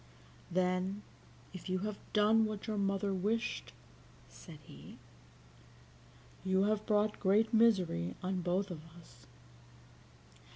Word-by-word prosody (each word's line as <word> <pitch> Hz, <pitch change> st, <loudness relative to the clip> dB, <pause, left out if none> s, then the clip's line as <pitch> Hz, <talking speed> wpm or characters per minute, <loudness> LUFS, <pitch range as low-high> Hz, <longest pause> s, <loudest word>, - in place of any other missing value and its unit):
"Then, 185 Hz, +3 st, 0 dB, 0.5 s
if 185 Hz, 0 st, -8 dB
you 185 Hz, -, +1 dB
have 210 Hz, -1 st, -4 dB
done 220 Hz, +1 st, +4 dB
what 215 Hz, -2 st, -4 dB
your 215 Hz, -2 st, -2 dB
mother 195 Hz, 0 st, 0 dB
wished," 215 Hz, +5 st, -1 dB, 0.6 s
said 165 Hz, -4 st, -12 dB
he, 70 Hz, -, -13 dB, 1.5 s
"you 190 Hz, 0 st, +2 dB
have 210 Hz, +1 st, 0 dB
brought 210 Hz, 0 st, +2 dB
great 210 Hz, +4 st, +3 dB
misery 185 Hz, -, +3 dB
on 185 Hz, 0 st, -1 dB
both 185 Hz, +3 st, 0 dB
of 160 Hz, -3 st, -6 dB, 0.2 s
us." 120 Hz, -7 st, -18 dB
195 Hz, 115 wpm, -34 LUFS, 180-210 Hz, 1.5 s, done